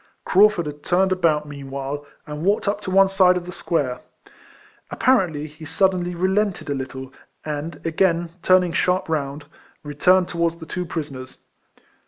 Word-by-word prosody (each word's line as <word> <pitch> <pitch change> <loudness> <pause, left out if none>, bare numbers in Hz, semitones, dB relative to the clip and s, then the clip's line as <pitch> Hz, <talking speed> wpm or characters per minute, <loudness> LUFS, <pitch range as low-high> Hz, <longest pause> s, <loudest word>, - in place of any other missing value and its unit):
Craufurd 200 -2 +4
had 150 0 -7
turned 185 +3 +2
about 160 -5 +1
meanwhile, 140 0 -6 0.2
and 150 0 -6
walked 200 +2 +1
up 205 +1 0
to 195 - -5
one 195 +1 +5
side 185 -2 +4
of 175 - -5
the 180 - -7
square. 145 -8 -2 0.9
Apparently 185 - +1
he 155 +1 -12
sud 190 +5 +2
denly 175 -2 -4
relented 190 -3 0
a - - +2
little, 130 -1 -6 0.3
and, 150 +1 -4
again 170 0 +1
turaing 180 -1 +3
sharp 180 +1 +1
round, 145 -2 -3 0.4
returned 175 +5 +3
towards 170 -1 -1
the 165 -1 -10
two 180 +2 -4
prisoners. 135 -6 -6
170 Hz, 155 wpm, -22 LUFS, 145-185 Hz, 0.9 s, one